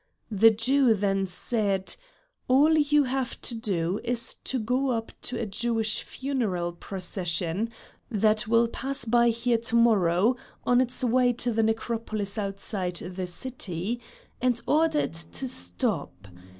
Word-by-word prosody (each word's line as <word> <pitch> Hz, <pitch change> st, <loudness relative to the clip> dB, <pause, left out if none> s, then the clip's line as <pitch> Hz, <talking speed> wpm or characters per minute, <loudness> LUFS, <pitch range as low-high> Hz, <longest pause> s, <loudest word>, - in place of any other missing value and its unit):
The 215 Hz, +2 st, +6 dB
Jew 245 Hz, +2 st, +3 dB
then 195 Hz, -1 st, 0 dB
said: 195 Hz, +1 st, -1 dB, 0.5 s
"All 290 Hz, +5 st, +5 dB
you 295 Hz, -1 st, +3 dB
have 260 Hz, -1 st, -3 dB
to -, -, -1 dB
do 195 Hz, -5 st, -1 dB
is 235 Hz, -1 st, +2 dB
to 260 Hz, -, -1 dB
go 250 Hz, +4 st, 0 dB
up 225 Hz, -2 st, -2 dB, 0.2 s
to 250 Hz, -, -4 dB
a 230 Hz, -, -2 dB
Jewish 225 Hz, +1 st, +1 dB
funeral 220 Hz, -11 st, -2 dB
procession 180 Hz, +2 st, -2 dB, 0.4 s
that 215 Hz, -1 st, +1 dB
will 230 Hz, +1 st, +4 dB
pass 270 Hz, +3 st, -1 dB
by 235 Hz, +1 st, +4 dB
here 235 Hz, 0 st, 0 dB
to 230 Hz, 0 st, -2 dB
morrow 220 Hz, -1 st, +3 dB, 0.3 s
on 245 Hz, 0 st, +4 dB
its 255 Hz, +1 st, +1 dB
way 250 Hz, 0 st, +3 dB
to 240 Hz, +1 st, -2 dB
the 225 Hz, 0 st, +1 dB
necropolis 220 Hz, -2 st, -1 dB
outside 195 Hz, -2 st, -3 dB
the 180 Hz, +1 st, -5 dB
city, 210 Hz, 0 st, -4 dB, 0.4 s
and 245 Hz, -2 st, +2 dB
order 315 Hz, +1 st, +2 dB
it 165 Hz, 0 st, -4 dB
to 265 Hz, -, -3 dB
stop. 215 Hz, -, -1 dB
225 Hz, 140 wpm, -26 LUFS, 195-250 Hz, 0.5 s, The